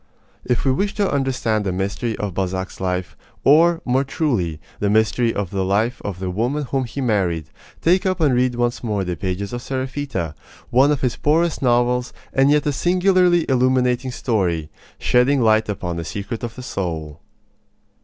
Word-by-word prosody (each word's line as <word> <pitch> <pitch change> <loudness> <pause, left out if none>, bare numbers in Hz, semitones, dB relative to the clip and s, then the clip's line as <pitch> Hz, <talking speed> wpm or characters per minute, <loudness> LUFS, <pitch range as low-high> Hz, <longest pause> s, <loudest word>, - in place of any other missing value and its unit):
If 125 +1 -1
we 135 - +4
wish 200 +10 -1
to 205 -2 +1
understand 130 -6 0
the 95 - -1
mystery 100 +5 -2
of 100 -3 -3
Balzac's 95 0 -3
life 90 -1 -2 0.3
or, 165 +4 +5
more 130 +2 +2
truly, 120 - -1 0.2
the 100 - +1
mystery 110 +2 +2
of 100 -5 -3
the 95 -1 -1
life 105 +6 0
of 100 -3 -4
the 95 0 -3
woman 125 +10 -1
whom 135 -1 -1
he 120 +4 -5
married 90 - 0 0.3
take 180 +3 +3
up 185 0 0
and 150 -5 +3
read 125 0 +2
once 120 0 -1
more 105 -4 -1
the 90 -1 -3
pages 95 +3 -4
of 120 - -4
Seraphita, 130 - -3 0.4
one 135 +4 +5
of 145 - 0
his 125 -3 0
poorest 165 +2 +1
novels 125 0 +2 0.2
and 135 +1 +4
yet 150 0 +3
a 145 - +2
singularly 180 +1 +3
illuminating 130 0 +2
story, 90 - -1 0.3
shedding 130 +3 +3
light 110 -2 +3
upon 90 -4 -3
a - - -3
secret 100 +7 -5
of 115 -1 -5
the 125 - -8
soul. 80 - -4
120 Hz, 175 wpm, -21 LUFS, 95-135 Hz, 0.4 s, or